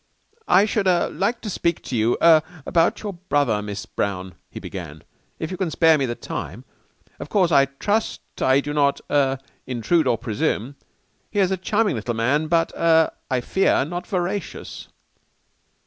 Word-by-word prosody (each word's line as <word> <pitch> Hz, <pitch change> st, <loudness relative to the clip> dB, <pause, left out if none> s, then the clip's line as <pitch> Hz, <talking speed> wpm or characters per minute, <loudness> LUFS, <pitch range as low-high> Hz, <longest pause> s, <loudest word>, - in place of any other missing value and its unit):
"I 195 Hz, +3 st, +5 dB
should 215 Hz, -2 st, 0 dB
like 195 Hz, +5 st, +1 dB
to 215 Hz, -, -5 dB
speak 170 Hz, -2 st, -1 dB
to 130 Hz, -, -4 dB
you 115 Hz, +1 st, +2 dB
er 165 Hz, -2 st, +7 dB, 0.2 s
about 165 Hz, +4 st, +1 dB
your 205 Hz, -2 st, -4 dB
brother, 145 Hz, -, 0 dB
Miss 100 Hz, -1 st, -6 dB
Brown," 95 Hz, -2 st, -3 dB, 0.2 s
he -, -, -8 dB
began, -, -, -8 dB, 0.3 s
"if 160 Hz, -, -5 dB
you 185 Hz, -, -4 dB
can 185 Hz, -2 st, -1 dB
spare 160 Hz, 0 st, +4 dB
me 140 Hz, -3 st, 0 dB
the 120 Hz, -, -3 dB
time, -, -, -6 dB, 0.5 s
of -, -, -7 dB
course. 185 Hz, -4 st, +2 dB
I 140 Hz, -2 st, +6 dB
trust 205 Hz, +11 st, -2 dB, 0.2 s
I 130 Hz, +1 st, +4 dB
do 145 Hz, +1 st, -4 dB
not 140 Hz, -1 st, +2 dB
er 135 Hz, -2 st, +2 dB, 0.3 s
intrude 130 Hz, +6 st, +1 dB
or 120 Hz, -, +2 dB
presume. 115 Hz, +2 st, -2 dB, 0.6 s
He 210 Hz, -, -7 dB
is 195 Hz, -2 st, +3 dB
a -, -, +2 dB
charming 205 Hz, 0 st, 0 dB
little 115 Hz, +2 st, -3 dB
man 135 Hz, +7 st, +1 dB
but 165 Hz, 0 st, +2 dB
er 160 Hz, -1 st, +4 dB, 0.2 s
I 130 Hz, -1 st, 0 dB
fear 190 Hz, -1 st, +2 dB
not 175 Hz, +3 st, -5 dB
veracious. 190 Hz, +1 st, -4 dB
155 Hz, 170 wpm, -22 LUFS, 130-185 Hz, 0.6 s, er